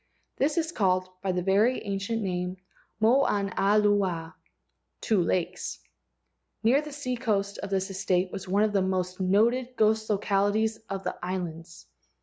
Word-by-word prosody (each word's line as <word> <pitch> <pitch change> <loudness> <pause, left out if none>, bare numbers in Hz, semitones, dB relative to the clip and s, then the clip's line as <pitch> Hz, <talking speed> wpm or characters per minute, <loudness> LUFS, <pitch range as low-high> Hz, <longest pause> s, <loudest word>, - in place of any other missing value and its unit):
This 295 +3 +1
is 325 0 0
called 185 - +1
by 195 - 0
the 180 -1 -1
very 205 +7 +2
ancient 205 +3 -2
name 180 -1 -2 0.4
Moanalua 205 -6 +2 0.7
(two 215 -5 +2
lakes). 175 0 -1 0.9
Near 250 +6 +4
the 300 0 -8
seacoast 235 -8 -2
of 200 - -5
this 195 0 -1
estate 185 -1 0
was 190 0 -6
one 200 +3 +2
of 215 -1 +1
the 195 - +3
most 185 -1 -1
noted 235 +7 +2
ghost 220 0 +2
localities 210 +2 +1
of 195 -1 -4
the - - -3
islands. 170 -2 -5
200 Hz, 135 wpm, -27 LUFS, 185-220 Hz, 0.9 s, Near